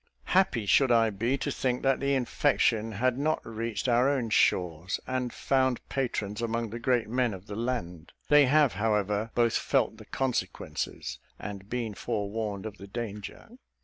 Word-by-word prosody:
Happy 180 - +3
should 130 +5 +4
I 115 -2 +4
be 115 +7 0
to - - -2
think 125 -1 -1
that 135 -1 +3
the 140 0 +1
infection 120 -4 +1
had 125 +5 +1
not 155 +2 +1
reached 115 0 -3
our 125 +2 +4
own 125 -6 -1
shores, 90 -2 +2
and 130 -1 -2
found 130 -2 +1
patrons 115 -6 -2
among 115 -1 -2
the 115 - -5
great 120 -2 +1
men 120 -2 0
of 95 +1 -12
the 105 - -7
land. 95 -8 -3 0.2
They 145 -2 +6
have, 145 -2 +4
however, 105 +1 0
both 115 -1 +3
felt 120 -5 +1
the 110 - -12
consequences, 130 +1 -3 0.2
and 100 -1 -7
been 115 -3 -2
forewarned 105 -1 -3
of 105 -1 -7
the 100 - -9
danger. 105 -2 -6
115 Hz, 165 wpm, -28 LUFS, 105-130 Hz, 0.2 s, They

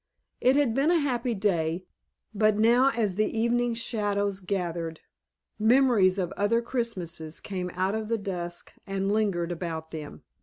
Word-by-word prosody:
It 255 +2 +4
had 280 -5 +3
been 275 +6 +2
a 350 - +4
happy 250 -4 -1
day, 180 -3 0 0.5
but 215 0 +3
now 240 +5 +5
as 215 -7 -1
the 215 +1 0
evening 240 +1 +1
shadows 205 -4 -1
gathered 175 -4 -3 0.6
memories 220 -5 +4
of 180 -3 -1
other 205 +3 +1
Christmases 180 -11 -3
came 185 -3 -4
out 190 +2 0
of 220 0 -2
the 230 +1 0
dusk 175 -4 -4
and 195 0 -1
lingered 195 -5 0
about 165 -2 -5
them. 155 -2 -8
205 Hz, 150 wpm, -27 LUFS, 180-230 Hz, 0.6 s, now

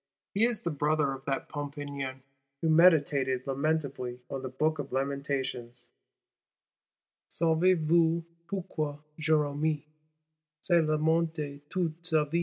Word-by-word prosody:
He 210 +3 +4
is 235 -2 0
the 170 - -2
Brother 150 -1 +1
of 135 0 -9
that 135 -1 -2
Pompignan 140 -2 -5 0.4
who 165 - +3
meditated 145 -6 +4
lamentably 140 -3 -1
on 135 - -3
the 130 - -4
Book 155 +4 0
of 140 -1 -5
Lamentations: 130 -3 -3 1.4
Saves 170 +3 +3
voux 165 +1 +3 0.2
pourquoi 155 -6 -3 0.2
Jérémie 155 -1 +1 0.7
Se 175 - -1
lamentait 155 -2 +1
toute 170 -3 -2
sa 160 -3 +2
vie? 165 +4 0
150 Hz, 115 wpm, -30 LUFS, 140-160 Hz, 1.4 s, He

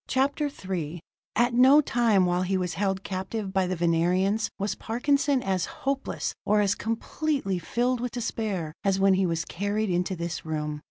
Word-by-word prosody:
CHAPTER 280 +3 +1 0.2
III 175 -3 -3 0.4
At 240 +2 +3
no 260 +4 +7
time 230 -9 +3
while 180 0 +1
he 190 +1 0
was 180 -2 -2
held 195 -1 -1
captive 190 +1 -4
by 190 -1 +2
the 185 - -1
Venerians 180 +5 +1
was 200 +1 -1
Parkinson 275 +3 +1
as 185 -3 0 0.2
hopeless, 275 0 -2
or 210 0 +3
as 200 -1 +3
completely 230 - -2
filled 245 +7 0
with 250 -1 -3
despair 215 -9 -3
as 195 -1 +2
when 195 0 +5
he 190 0 +2
was 165 -1 -1
carried 205 +2 -1
into 180 +2 0
this 170 -1 -4
room. 150 -1 -3
195 Hz, 170 wpm, -27 LUFS, 180-240 Hz, 0.4 s, no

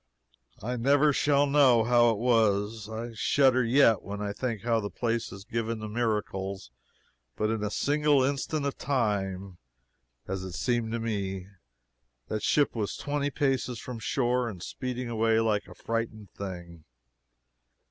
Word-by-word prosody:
I 125 +3 -2
never 145 +4 +4
shall 145 0 +3
know 140 -5 +5
how 120 0 +4
it 115 - +1
was 110 -2 +1
I 115 +2 -5
shudder 130 +2 +3
yet 115 -2 +4
when 100 +1 -6
I 105 -1 -3
think 115 -2 -3
how 115 -1 +2
the 100 -2 -4
place 115 0 -2
is 95 0 -9
given 115 0 -2
to 110 - -5
miracles 100 - -2 0.6
but 110 +1 0
in 110 -2 -2
a 105 - 0
single 145 +3 +2
instant 140 +2 -1
of 140 - -3
time, 100 -8 -1 0.7
as 95 0 -3
it 95 -1 -7
seemed 115 +4 -1
to 115 - -1
me, 100 -4 -3 0.8
that 110 - -2
ship 145 +5 +2
was 105 -3 -2
twenty 145 0 -1
paces 135 -4 0
from 125 +1 -7
the - - -11
shore, 125 0 0
and 90 -5 -8
speeding 125 +2 -4
away 115 -1 +2
like 110 -2 0
a - - -12
frightened 115 -2 -4
thing! 85 -4 -8
115 Hz, 155 wpm, -28 LUFS, 105-125 Hz, 0.8 s, know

